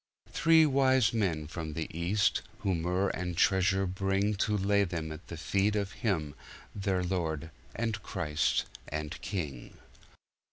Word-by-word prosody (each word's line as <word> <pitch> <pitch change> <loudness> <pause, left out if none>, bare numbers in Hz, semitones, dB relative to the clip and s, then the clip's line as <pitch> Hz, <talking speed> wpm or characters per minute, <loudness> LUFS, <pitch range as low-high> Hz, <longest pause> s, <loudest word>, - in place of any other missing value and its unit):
Three 165 -1 +5
wise 130 -5 +3
men 90 -9 0
from 80 -1 -6
the 80 - -2
east 95 +5 +1 0.2
who 95 - +1
myrrh 90 +3 0
and 90 -2 -3
treasure 95 +1 +3
bringTo 95 +2 0
lay 100 +1 +3
them 85 -4 -3
at 80 +2 -9
the 85 - -7
feet 100 +5 +1
of 100 -1 -1
him 80 -10 -1 0.4
their 95 -2 0
Lord 80 -3 -2 0.2
and 110 -3 -2
Christ 75 -8 0 0.2
and 75 0 -4
King. 75 -10 -5
95 Hz, 135 wpm, -30 LUFS, 80-100 Hz, 0.4 s, Three